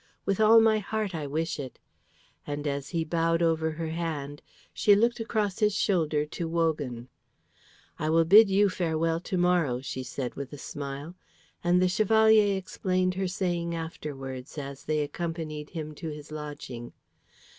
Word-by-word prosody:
With 195 +1 0
all 220 +1 +8
my 220 -1 +4
heart 210 -1 -3
I 155 -3 -3
wish 160 +3 -2
it;" 130 -3 -7 0.7
and 145 0 -4
as 140 -1 -2
he 165 -2 -1
bowed 165 +1 +1
over 160 -1 +2
her 160 0 -4
hand, 155 -4 -4 0.3
she 205 - +5
looked 235 +4 +2
across 215 -4 -1
his 210 -2 +2
shoulder 160 -8 +1
to 165 +2 -5
Wogan. 150 -8 -1 0.9
"I 155 - -1
will 165 +1 +4
bid 205 +5 +8
you 200 +2 +4
farewell 165 -3 0
to 185 +2 -3
morrow," 175 -8 +2
she 130 0 -5
said 130 0 -4
with 140 -1 -7
a - - -6
smile, 140 +3 -6 0.5
and 175 +1 +4
the 185 - +4
Chevalier 215 +1 +4
explained 185 -1 -1
her 190 +1 -1
saying 175 -2 -2
afterwards 135 -5 -6
as 140 -1 -7
they 155 0 +1
accompanied 155 -1 -4
him 155 -3 -6
to 160 +2 -6
his 150 0 -9
lodging. 145 -6 -7
165 Hz, 160 wpm, -28 LUFS, 150-185 Hz, 0.9 s, all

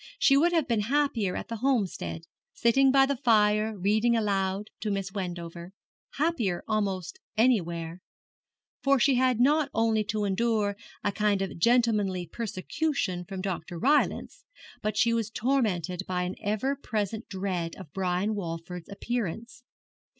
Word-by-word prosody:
She 275 - +5
would 335 +5 +4
have 325 -5 +1
been 230 -4 +1
happier 230 -4 0
at - - -5
the 230 - -4
Homestead, 220 -9 -1 0.3
sitting 265 +3 +4
by 270 0 +6
the 280 0 -1
fire 215 -3 +3
reading 215 +5 +2
aloud 200 -1 -1
to 215 - -3
Miss 195 -1 -2
Wendover 175 -2 -6 0.4
happier 255 - 0
almost 200 - -2 0.2
anywhere 170 -8 +1 0.8
for 275 -1 +3
she 275 +3 +4
had 255 -2 +2
not 290 +3 +3
only 225 -1 +2
to 210 +1 -1
endure 205 0 +1 0.3
a 205 - +1
kind 205 -1 +1
of 195 - -5
gentlemanly 210 -4 +2
persecution 195 - -2
from 190 +1 -6
Dr. 180 -2 -4
Rylance, 285 - +1 0.4
but 215 0 -2
she 235 -1 +3
was 225 -2 0
tormented 210 - 0
by 180 -1 -1
an 180 +1 -3
ever 215 +7 0
present 220 -4 -3
dread 185 -4 -3
of 165 -7 -12
Brian 190 +2 0
Walford's 175 -2 -6
appearance. 230 +2 -4
210 Hz, 145 wpm, -28 LUFS, 185-240 Hz, 0.8 s, by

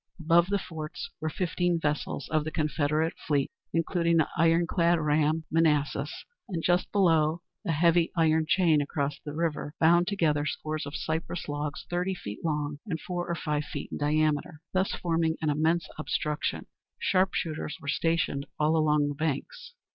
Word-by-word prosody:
Above 170 +2 +4
the 200 +1 +1
forts 160 -5 -6
were 155 - -1
fifteen 175 0 0
vessels 150 -2 -2
of 155 -1 +1
the 155 - -3
Confederate 155 0 0
fleet, 145 -3 +1 0.2
including 170 0 +1
the 160 - +3
ironclad 170 +1 +3
ram, 155 +1 +2
Manassas, 150 -3 +1 0.2
and 170 -4 -3
just 175 0 +2
below, 165 -4 +3 0.2
a - - +2
heavy 170 +2 +3
iron 160 -1 +3
chain 160 -2 +4
across 145 0 -2
the 150 -1 -6
river 160 -2 -2
bound 170 +2 +5
together 160 -8 +1
scores 155 0 -3
of 140 - -6
cypress 160 +2 -3
logs 145 0 -4
thirty 180 +2 -1
feet 105 - -8
long, 150 -2 -1
and 165 -5 -2
four 175 +1 -4
or 170 - 0
five 150 -2 -2
feet - - -6
in - - -4
diameter, 155 +1 0
thus 190 +1 +1
forming 165 -1 0
an 155 -2 +1
immense 160 +3 +1
obstruction. 150 -1 -2 0.3
Sharpshooters 175 -4 0
were 140 - -11
stationed 150 -2 0
all 155 +1 +3
along 150 -2 +3
the 145 - -2
banks. 160 - -4
160 Hz, 160 wpm, -28 LUFS, 150-170 Hz, 0.3 s, bound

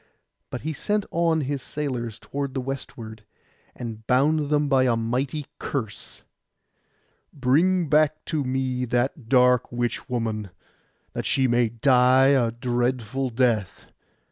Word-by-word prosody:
But 125 - -5
he 160 +1 -3
sent 210 +6 -1
on 165 -1 +2
his 140 0 -3
sailors 125 -6 -4
toward 140 -1 -5
the - - 0
westward, 120 -4 -7 0.5
and 110 -2 -7
bound 145 +3 +2
them 150 -1 +2
by 135 -2 +3
a 120 -2 +3
mighty 125 +6 -2
curse—'Bring 145 - -3
back 155 +1 +2
to 155 -3 -1
me 130 -1 -1
that 120 +1 -1
dark 125 -1 +4
witch 120 0 -3
woman, 110 -4 -2 0.6
that - - -3
she 130 -1 +2
may 120 -1 +2
die 130 +2 +4
a 130 -4 +3
dreadful 125 +1 -1
death. 115 -5 0
130 Hz, 125 wpm, -24 LUFS, 120-140 Hz, 0.6 s, dark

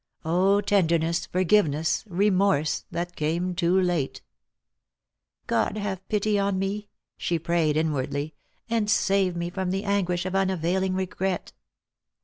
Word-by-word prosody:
O 190 +5 +3
tenderness, 170 -4 +1
forgiveness, 170 -5 +2
remorse, 190 -4 +1
that 175 +1 -4
came 170 +4 -1
too 175 +1 +2
late! 175 -7 -1 0.6
" 60 +1 -63
God 210 - 0
have 190 -2 -4
pity 210 -1 +1
on 200 -1 0
me," 200 +2 -3 0.3
she 170 - -1
prayed 165 -2 +1
inwardly, 150 -1 -1 0.3
"and 225 -2 0
save 195 -3 +2
me 170 0 -3
from 190 0 -2
the 195 +2 -1
anguish 185 -3 0
of 185 - -3
unavailing 190 0 0
regret 190 0 -2
185 Hz, 130 wpm, -26 LUFS, 170-195 Hz, 0.6 s, O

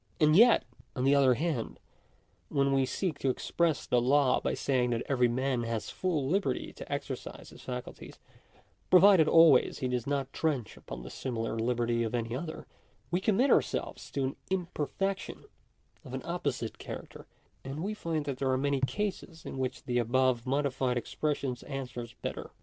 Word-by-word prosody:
And 155 -1 +5
yet, 230 +4 +6 0.3
on 125 - -1
the 135 +1 +4
other 135 -3 +5
hand, 150 -5 -2 0.7
when 140 -1 +2
we 135 -1 +2
seek 170 -3 -2
to 135 - +1
express 160 +4 0
the 125 - +2
law 130 +1 +3
by - - -1
saying 125 -3 +1
that 120 -1 -1
every 125 -3 +3
man 130 +1 0
has 115 -2 -3
full 160 -7 -1
liberty 170 -5 -1
to - - -10
exercise - - -5
his - - -13
facul 125 -1 -6
ties, - - -12 0.7
provided 185 -3 +7
always 165 -6 +6
he 130 - -2
does 125 -1 -2
not 140 -1 -2
trench 140 -9 -1
upon - - -9
the - - -9
similar 115 -4 -3
liberty 120 0 0
of 115 0 -1
any 115 0 -2
other, 160 +4 -6 0.5
we 175 +2 +1
commit 220 +7 +3
ourselves - - 0
to 140 - 0
an 130 +2 -2
imperfection 190 +1 -2 0.6
of - - -7
an - - -5
opposite - - -3
character; - - -8 0.4
and 140 +4 -5
we 205 +2 -2
find 165 -7 -3
that 135 -2 -4
there 135 - 0
are 130 - +2
many 140 +1 +1
cases 185 +1 -3
in 135 - -6
which 130 -1 -3
the 125 -1 0
above 125 +1 +1
modified 130 -2 0
expression 140 +1 -2
answers 125 -4 -6
better. - - -4
135 Hz, 170 wpm, -30 LUFS, 125-160 Hz, 0.7 s, provided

